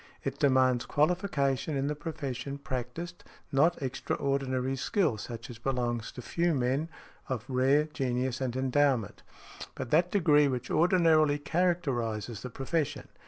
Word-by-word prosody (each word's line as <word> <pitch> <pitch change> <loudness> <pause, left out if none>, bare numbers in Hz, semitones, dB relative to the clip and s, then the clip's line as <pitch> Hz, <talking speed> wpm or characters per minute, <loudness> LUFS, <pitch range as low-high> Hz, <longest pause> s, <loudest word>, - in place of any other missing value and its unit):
It - - -3
demands 130 -3 +3
qualification 150 -4 +1
in 135 - 0
the 150 - 0
profession 140 -3 -5
practised, 140 +6 -5 0.3
not 160 +6 +3
extraordinary 135 0 -1
skill 135 - 0
such 115 +2 -7
as 115 - -11
belongs 120 -3 -2
to 125 - -8
few 170 +3 +1
men 135 +5 0 0.4
of 125 -3 -3
rare 135 +3 +3
genius 130 -3 -2
and 130 -2 -2
endowment, 130 -4 +1 0.5
but 120 - -6
that 170 +3 +4
degree 150 -7 +4
which 125 -2 -3
ordinarily 160 -3 +4
characterizes 135 - -1
the 125 - -6
profession. 145 +2 -2
135 Hz, 130 wpm, -30 LUFS, 125-155 Hz, 0.5 s, that